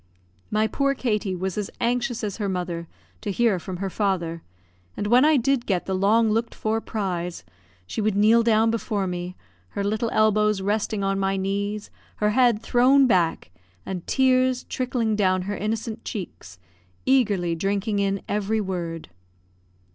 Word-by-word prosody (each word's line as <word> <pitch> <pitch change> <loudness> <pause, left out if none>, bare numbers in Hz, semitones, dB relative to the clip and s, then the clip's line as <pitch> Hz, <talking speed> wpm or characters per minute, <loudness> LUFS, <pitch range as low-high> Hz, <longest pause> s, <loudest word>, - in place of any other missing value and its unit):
My 215 +1 +2
poor 275 +4 0
Katie 210 -7 -1
was 190 +2 -3
as 205 - -3
anxious 240 0 -1
as 205 -3 -3
her 205 -3 -2
mother 175 -2 -3 0.3
to 215 - -4
hear 205 -1 +2
from 180 +1 -6
her 195 +1 -3
father; 175 -5 -1 0.6
and - - -2
when 240 +5 +5
I 305 0 +5
did 260 0 +1
get 185 -4 0
the 190 - -2
long 215 +4 +3
looked 225 +2 -1
for 220 +1 -1
prize, 180 -6 -3 0.4
she 215 - -4
would 210 -1 +1
kneel 220 +3 +5
down 225 -1 +3
before 215 -3 -1
me, 180 0 -4 0.3
her 200 - -3
little 215 +3 0
elbows 215 -1 +3
resting 205 +1 -1
on 195 0 0
my 195 0 0
knees, 200 +2 -2 0.2
her 210 0 +1
head 235 -2 +3
thrown 265 +3 +5
back, 175 - +1 0.3
and 185 -2 -5
tears 255 -1 +2
trickling 245 -4 -1
down 185 -3 +2
her 205 +2 -3
innocent 220 +2 -3
cheeks, 90 - -7 0.5
eagerly 205 -10 +2
drinking 200 +4 -1
in 195 -1 0
every 210 +1 0
word. 175 - -4
210 Hz, 160 wpm, -24 LUFS, 190-225 Hz, 0.6 s, when